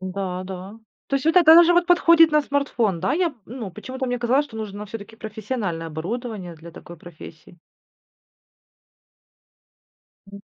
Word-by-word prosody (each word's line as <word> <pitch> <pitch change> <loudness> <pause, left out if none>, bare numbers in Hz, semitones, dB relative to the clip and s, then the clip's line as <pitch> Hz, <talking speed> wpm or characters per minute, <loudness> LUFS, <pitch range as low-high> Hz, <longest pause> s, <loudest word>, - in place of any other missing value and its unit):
Да, 185 -1 -4
да. 190 +3 -9 0.3
То 275 - -2
есть 275 - -5
вот 320 +2 +2
так, 360 -3 +5
да, 320 - +10
даже 340 +1 +7
подходит 335 -2 +5
на 300 -1 +4
смартфон, 245 -10 -1
да, - - 0
я, 355 +3 +1
м, - - -13
ну, 230 -4 -7
почему-то 260 +7 -6
мне 245 0 -2
казалось, 250 +4 +1
что 260 -6 -12
нужно 210 -1 -6
всё-таки 220 +1 -10
профессиональное 210 -6 -5
оборудование 185 +3 -6
для 165 +1 -13
такой 175 +1 -12
профессии. 165 0 -14 2.7
Мгм. 200 0 -12
220 Hz, 155 wpm, -22 LUFS, 185-275 Hz, 2.7 s, да